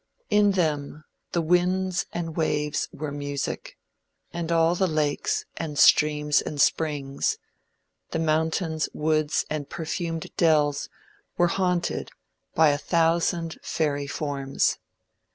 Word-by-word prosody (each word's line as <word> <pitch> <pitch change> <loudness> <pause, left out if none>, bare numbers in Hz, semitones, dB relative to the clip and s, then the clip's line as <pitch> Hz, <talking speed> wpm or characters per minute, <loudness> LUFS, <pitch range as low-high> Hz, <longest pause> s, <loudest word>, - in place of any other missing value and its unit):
In 205 -1 +4
them, 155 -4 -1 0.3
the 170 - 0
winds 180 +2 +1
and 165 -2 -4
waves 150 -2 0
were 150 0 -5
music, 145 -1 -4 0.6
and 170 -1 -3
all 165 0 +4
the 190 +1 +1
lakes, 155 -3 0
and 150 -3 -4
streams, 150 -1 +5
and 150 - -6
springs, 140 -3 +1 0.7
the - - -2
mountains, 160 0 0
woods 155 -1 +1
and 150 -2 -4
perfumed 165 0 -4
dells 150 -3 +2 0.5
were 175 0 +4
haunted 180 -1 -1 0.5
by 160 -1 +6
a 145 0 +1
thousand 165 0 +1
fairy 145 -3 -1
forms. 140 -2 -1
155 Hz, 115 wpm, -25 LUFS, 150-170 Hz, 0.7 s, by